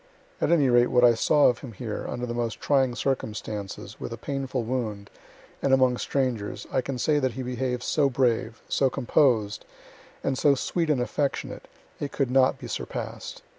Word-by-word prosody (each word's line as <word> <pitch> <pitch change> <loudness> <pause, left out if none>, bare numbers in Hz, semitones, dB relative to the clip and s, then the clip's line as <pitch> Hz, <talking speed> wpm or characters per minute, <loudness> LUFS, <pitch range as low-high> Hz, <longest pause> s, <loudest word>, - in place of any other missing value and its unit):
At - - +2
any 155 -5 +4
rate 120 0 +5
what 125 0 +3
I 120 -1 +7
saw 145 +6 +3
of 120 -1 +4
him 125 -4 -9
here, 105 0 -5
under 120 0 -3
the 120 - -4
most 120 -2 -2
trying 135 -4 +2
circumstances, 105 -6 -4
with - - -5
a 115 - -5
painful 135 0 -3
wound, 110 -4 -3 0.5
and 135 -1 +4
among 130 -2 +3
strangers, 125 -8 -2
I - - +2
can 130 +1 -4
say 150 +4 +2
that 130 -3 0
he 130 - -5
behaved 125 0 -2
so 145 -3 +2
brave, 120 -3 0
so 135 - +2
composed, 120 -6 +2 0.6
and 135 -1 -1
so 145 -2 +5
sweet 165 +4 -1
and 140 -5 +2
affectionate, 140 +3 -2 0.3
it 145 -1 -3
could 135 -3 -1
not 130 0 +4
be - - -10
surpass'd. - - -6
125 Hz, 180 wpm, -26 LUFS, 120-135 Hz, 0.6 s, I